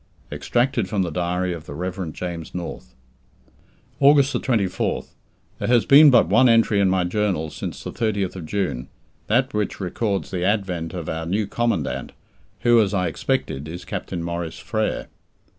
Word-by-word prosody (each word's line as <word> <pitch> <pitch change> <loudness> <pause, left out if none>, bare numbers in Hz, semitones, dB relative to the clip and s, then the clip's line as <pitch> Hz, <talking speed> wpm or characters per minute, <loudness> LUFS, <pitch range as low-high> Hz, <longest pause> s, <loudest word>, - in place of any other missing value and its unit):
EXTRACTED 120 -5 0
FROM 100 -3 +1
THE 85 - -3
DIARY 90 +2 -1
OF 80 -3 -9
THE 70 - -7
REV. 90 0 -4
JAMES 85 -1 -6
NORTH. 65 -8 -7 1.0
August 140 0 +5
24th. 105 -8 -1 0.5
There - - -2
has 120 -2 +4
been 145 +2 +8
but 125 -3 +5
one 130 -1 +5
entry 115 -3 +4
in 100 -1 +4
my 95 -1 +2
journal 90 -4 -1
since - - -6
the - - -5
30th 100 -5 -2
June, 80 -9 -2 0.4
that 125 +5 +2
which 105 -1 -2
records 100 +1 -2
the 90 -2 -2
advent 95 -4 -1
of 85 -3 -5
our 80 0 -3
new 100 +4 0
Commandant, 80 - -2 0.5
who, 120 -1 +5
as 100 -1 0
I 90 -2 +1
expected, 70 -2 -2
is 85 +3 -7
Captain 85 -2 -4
Maurice 85 -1 -4
Frere. - - -2
95 Hz, 160 wpm, -23 LUFS, 85-110 Hz, 1.0 s, been